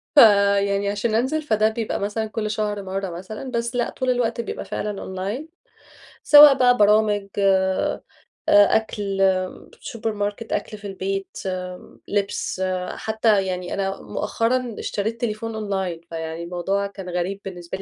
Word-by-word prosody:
فيعني 200 -4 +5
عشان 210 +2 -1
أنزل، 265 +7 +1
فده 215 -7 +2
بيبقى 220 0 -3
مثلًا 210 +2 -2
كل 215 -1 -3
شهر 210 -1 -2
مرة 195 0 -3
مثلًا، 190 +9 -7
بس 235 0 -2
لا، 240 -1 0
طول 260 -1 -3
الوقت 240 -2 0
بيبقى 230 - -6
فعلًا 205 -1 -4
أونلاين 200 +12 -5 0.7
سواء 295 -1 +9
بقى 245 -1 +4
برامج 210 -1 +3
آآ، 190 -1 +2 0.5
أكل 205 -1 +3 0.6
سوبر 230 -4 -4
ماركت 205 +2 -3
أكل 215 - -3
في 205 0 -8
البيت 195 0 -3 0.2
آمم، 180 -1 -6
لبس، 200 -2 -2 0.3
حتى 220 -2 +1
يعني 180 -1 -3
أنا 195 0 -2
مؤخرًا 240 0 -1
اشتريت 220 +3 -3
تليفون 225 -1 -3
أونلاين 190 -5 -3
فيعني 160 0 -5
الموضوع 185 +3 -1
كان 195 -2 -9
غريب 180 +3 -2
بالنسبة 180 -1 -6
لي؛ 195 - -9
205 Hz, 140 wpm, -23 LUFS, 195-225 Hz, 0.7 s, سواء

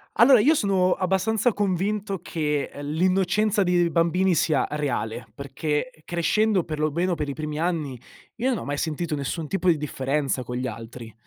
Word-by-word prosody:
Allora, 240 -1 +7
io 310 +6 +4
sono 190 -5 +2
abbastanza 200 +5 +1
convinto 200 0 -1
che, 150 -4 -1
ehm, 145 0 -7
l'innocenza 190 +6 +2
di 175 -1 +2
bambini 170 +2 +2
sia 155 -1 +2
reale, 120 -6 -2
perché, 150 - -3
crescendo, 185 +3 +1
per 155 -2 -5
lo 155 -1 +1
meno 175 +3 0
per 150 -2 -3
i - - -2
primi 150 0 -5
anni, 160 -7 -1 0.4
io 250 +3 0
non 245 - 0
ho - - -6
mai 145 0 -2
sentito 160 0 -2
nessun 150 +3 -3
tipo 185 0 0
di 160 - +4
differenza 135 -2 -1
con 125 +1 -5
gli 130 0 -2
altri. 115 0 -8
170 Hz, 175 wpm, -24 LUFS, 145-190 Hz, 0.4 s, Allora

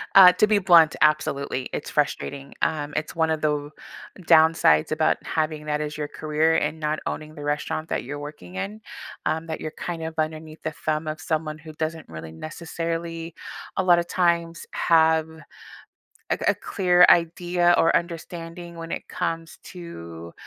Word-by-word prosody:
Uh, 185 -2 +11
to 215 - +3
be 210 -1 +3
blunt, 170 -5 +6
absolutely, 140 -3 +1
it's - - -4
frustrating, 140 -1 -2
um, 150 -2 -1
it's 155 - -3
one 160 -1 +2
of 155 - -1
tho 150 -1 -1 0.5
downsides 160 - +5
about 155 0 +2
having 155 -1 -2
that 150 0 -1
as 150 0 -4
your 150 -1 -3
career, 155 +2 +1
and 155 +1 -1
not 155 0 -1
owning 155 0 -5
the 145 - -8
restaurant 150 +2 -2
that - - -1
you're 145 +4 -6
working 145 -12 -9
in, 210 - -5 0.4
um, 160 +1 -1
that 160 - -5
you're 155 - -4
kind 170 -2 -4
of 160 0 -4
underneath 155 0 -3
the 160 -1 -3
thumb 155 0 0
of 155 0 -4
someone 155 -1 -2
who 155 +1 -11
doesn't 160 0 -4
really, 80 0 -8
necessarily, 165 - -5 0.4
a 190 - +2
lotta 175 -1 +5
times, 170 -1 0
have 160 -1 +3 1.0
a - - +2
a - - +3
clear 180 -2 +4
idea 175 +1 +3
or 165 - +4
understanding 170 0 -4
when 165 0 -7
it - - -5
comes 165 0 -4
to 85 - -9
160 Hz, 165 wpm, -24 LUFS, 150-170 Hz, 1.0 s, Uh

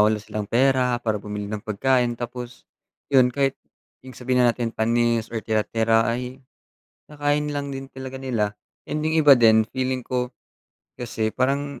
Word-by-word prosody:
wala 105 +1 +4
silang 105 -1 -5
pera 125 0 +3
para 110 -3 0
bumili 105 0 -5
ng 105 - -3
pagkain 120 +3 +1
tapos, 120 +1 -7 0.5
'yun 130 -3 +5
kahit 135 -1 0 0.5
yung 130 - -10
sabihin 125 0 0
na 120 - +3
natin 120 -2 -2
panis 115 0 +1
or 110 - -2
tira-tira 115 +1 +2
ay, 125 +2 -3 0.7
kinakain 145 0 0
na 145 - -3
lang 140 0 -3
din 135 0 -6
talaga 130 0 -8
nila. 115 -6 -1 0.4
And 155 - -1
yung 160 0 +2
iba 140 -3 +8
din 110 -1 +6
feeling 130 0 -1
ko, 125 0 -2 0.7
kasi 110 -2 -2
parang 140 +2 -1
125 Hz, 165 wpm, -23 LUFS, 115-135 Hz, 0.7 s, iba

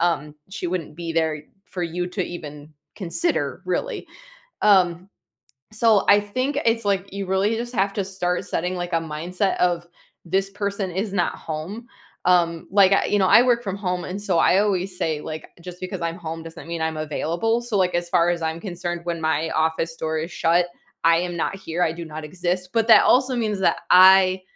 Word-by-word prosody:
um, 155 -3 0 0.2
she 190 -2 -4
wouldn't 170 -4 -4
be 170 -1 -5
there 160 -2 0 0.2
for 180 - -6
you 175 +1 -2
to, 185 +1 -2
even 150 -3 -9 0.2
consider, 220 - -2
really. - - -2 0.6
Um, 185 -2 +3 0.6
so, 220 -2 +3
I 200 - +7
think, 255 +8 -2
it's, 230 -1 +1
like, 195 -1 -1
you 200 0 -4
really 195 +4 +1
just 240 +2 -5
have 195 -2 +1
to 200 - -1
start 185 -2 -2
setting, 180 +2 -2
like, 175 0 -4
a - - +4 0.2
mindset 180 +5 -1
of, 175 -1 +1 0.4
"This 195 +3 0
person 200 -1 -3
is 195 +3 -3
not 180 -3 0
home." 165 +9 -6 0.4
Um, 170 -2 +2
like, 195 0 +5
I 195 - +4
you 205 - +4
know, 190 - +3
I 230 - +7
work 245 -1 +2
from 195 -2 -3
home, 180 -3 -2
and, 190 +2 -5
so, 185 -5 +1
I 185 - +4
always 195 -2 0
say, 155 -2 -1
like, 155 0 -7
"Just 180 +1 -10
because 185 - -5
I'm 165 0 -2
home 165 -1 -6
doesn't 165 0 -10
mean 170 -1 -3
I'm 160 -1 -2
available." 170 +9 -1
So, 235 -3 -3
like, 185 -1 +1
as 175 0 -1
far 170 0 +3
as 170 -1 -2
I'm 160 +1 -2
concerned, 175 -2 -5
when 170 -1 -3
my 160 0 0
office 160 +1 0
door 160 -1 -2
is 160 +3 -4
shut, 175 +2 +2 0.4
I 165 0 +6
am 175 0 -3
not 170 - -2
here, 180 -2 -3
I 160 - +2
do 170 +1 -7
not 155 -1 -8
exist, 180 +3 -3
but, 225 -1 +2
that 220 - +8
also 255 0 +3
means 215 -4 -1
that 190 - +2
I 185 0 +7
180 Hz, 205 wpm, -23 LUFS, 165-200 Hz, 0.6 s, that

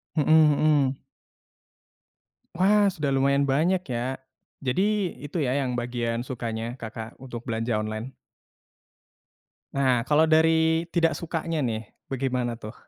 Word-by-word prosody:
Hmm 150 -3 +2 0.3
hmm. 145 -3 +2 1.6
Wah, 205 +2 +4
sudah 150 -7 -2
lumayan 140 +1 +2
banyak, 160 +8 +2
ya. 125 0 -3 0.4
Jadi 190 +8 0
itu, 145 +4 -5
ya, 130 -3 0
yang 125 -3 -1
bagian 120 0 -2
sukanya 115 -1 -4
Kakak 110 -1 -7
untuk 120 -2 -8
belanja 115 -1 -1
online? 110 +4 -4 1.6
Nah, 130 -4 +2
kalau 150 +5 +3
dari 160 +1 +4
tidak 165 -3 +2
sukanya, 165 -1 -3
nih, 110 -3 -2 0.2
bagaimana, 125 -3 -1
tuh? 110 -2 -9
135 Hz, 115 wpm, -26 LUFS, 120-160 Hz, 1.6 s, Wah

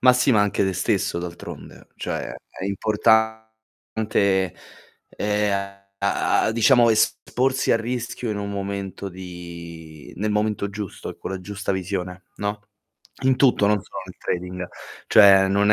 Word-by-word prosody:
Ma, 125 0 +7
si 125 +2 +3
anche 105 -4 +3
te 95 - 0
stesso 95 0 0
d'altronde. 85 0 -8
Cioè, - - -4 0.2
è - - -7
importante, 110 -2 0 0.5
ehm, 100 -1 -1 0.2
a 100 0 +2
a, - - +2
diciamo, 115 +1 +5
esporsi 130 +4 +1
al - - +4
rischio 120 +1 -3
in 105 - -2
un 100 0 -4
momento 100 0 -4
di 85 -4 -10
nel 105 +3 -1
momento 105 -1 0
giusto, 100 -1 -6
e - - -10
con - - -6
la 95 -1 -4
giusta 100 +2 -4
visione, 95 -1 -3
no, 105 0 -3 0.6
in 130 0 +5
tutto, 125 -6 +4
non 105 -2 +2
solo - - -8
nel 90 -1 -12
trading. 90 0 -3 0.4
Cioè, 95 -1 +7
non 100 +2 +4
100 Hz, 140 wpm, -23 LUFS, 95-110 Hz, 0.6 s, Ma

